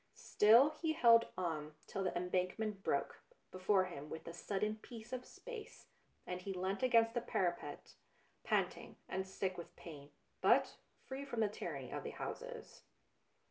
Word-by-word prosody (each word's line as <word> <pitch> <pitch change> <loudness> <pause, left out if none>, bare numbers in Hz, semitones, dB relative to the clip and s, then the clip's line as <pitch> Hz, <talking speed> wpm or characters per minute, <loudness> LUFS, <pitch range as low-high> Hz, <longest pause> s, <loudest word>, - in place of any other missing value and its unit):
Still 235 +8 +6
he 320 -2 +2
held 230 -6 +6
on, 155 -4 -2
till 195 - -3
the 180 - 0
Embankment 185 +4 -1
broke - - 0 0.3
before 185 +1 +3
him 150 -5 -7
with 160 - -6
the 165 - -7
sudden 210 +4 -1
peace 225 +1 -10
of 250 -1 -4
space, 480 -4 -9 0.4
and 180 0 -4
he 195 +1 -4
leant 190 +2 -2
against 230 -3 +5
the 240 - 0
parapet, 175 -9 -2 0.5
panting - - 0
and 190 0 -2
sick 190 -1 -2
with 170 - -9
pain, 145 -4 -10 0.3
but - - +4 0.3
free 270 +1 -5
from 260 -5 -4
the 220 - +4
tyranny 205 - -5
of - - -3
the - - -4
houses. - - -6
195 Hz, 155 wpm, -37 LUFS, 180-235 Hz, 0.5 s, Still